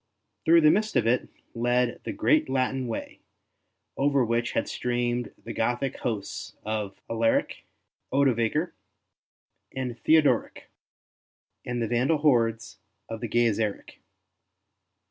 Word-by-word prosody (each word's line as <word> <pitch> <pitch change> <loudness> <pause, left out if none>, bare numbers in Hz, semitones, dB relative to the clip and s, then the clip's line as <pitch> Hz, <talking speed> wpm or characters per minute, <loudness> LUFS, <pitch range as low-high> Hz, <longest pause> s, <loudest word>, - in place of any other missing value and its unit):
Through 165 +1 +6
the 155 -1 +6
midst 215 +2 0
of 120 -3 +3
it 120 +2 +1 0.2
led 120 +1 0
the - - -2
great 310 0 +2
Latin 130 -1 0
Way, 115 - -6 0.8
over 140 -2 +2
which 115 +1 -1
had - - 0
streamed 120 0 -2
the - - -6
Gothic 120 +3 -1
hosts 110 -5 -4
of 105 -2 -3
Alaric, 115 0 0 0.5
Odovaker, 135 +4 +1 1.0
and 125 -3 -4
Theodoric, 155 +3 +2 0.9
and 120 -1 -2
the - - -1
Vandal 125 +7 +2
hordes 115 -6 +1 0.3
of 115 -1 -6
Gaiseric. 115 -3 -1
120 Hz, 110 wpm, -26 LUFS, 115-140 Hz, 1.0 s, Through